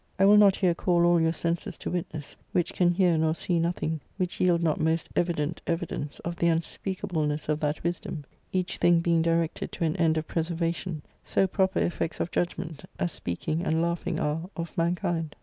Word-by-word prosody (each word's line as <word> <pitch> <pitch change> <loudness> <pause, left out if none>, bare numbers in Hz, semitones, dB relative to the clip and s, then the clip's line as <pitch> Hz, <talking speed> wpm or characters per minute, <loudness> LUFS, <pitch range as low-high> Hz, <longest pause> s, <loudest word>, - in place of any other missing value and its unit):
I 195 - +5
will 205 +1 +8
not 200 -2 +7
here 180 -3 +2
call 175 0 +2
all 175 -1 +4
your 160 0 +3
senses 170 0 -2
to - - -5
witness, 160 -4 -4 0.2
which 175 - +1
can 180 -1 +3
hear 175 -1 +3
nor 160 0 +2
see 170 +1 0
nothing 165 -2 -1 0.2
which 180 -2 -2
yield 175 -2 +3
not 155 -2 +1
most 160 +1 +1
evident 165 -2 0
evi 170 0 0
dence 145 0 -5
of 170 0 -4
the 170 - +2
unspeakableness 165 -2 -1
of 150 0 0
that 150 0 -1
wisdom, 170 -3 -3 0.3
each 185 0 -1
thing 175 -1 +4
being 170 -1 +3
directed 165 0 0
to 175 - -3
an 160 -1 +1
end 160 -2 +3
of 155 - -2
preservation; 165 -1 -2 0.2
so 195 - +2
proper 190 0 +1
effects 170 -1 -1
of 175 - -2
judg 175 - 0
ment, 160 -3 -6
as 175 - 0
speaking 150 - -2
and 160 -3 +1
laughing 170 +1 -1
are 160 +4 -1
of 170 0 -5
mankind. 170 -2 -1
170 Hz, 200 wpm, -27 LUFS, 160-175 Hz, 0.3 s, will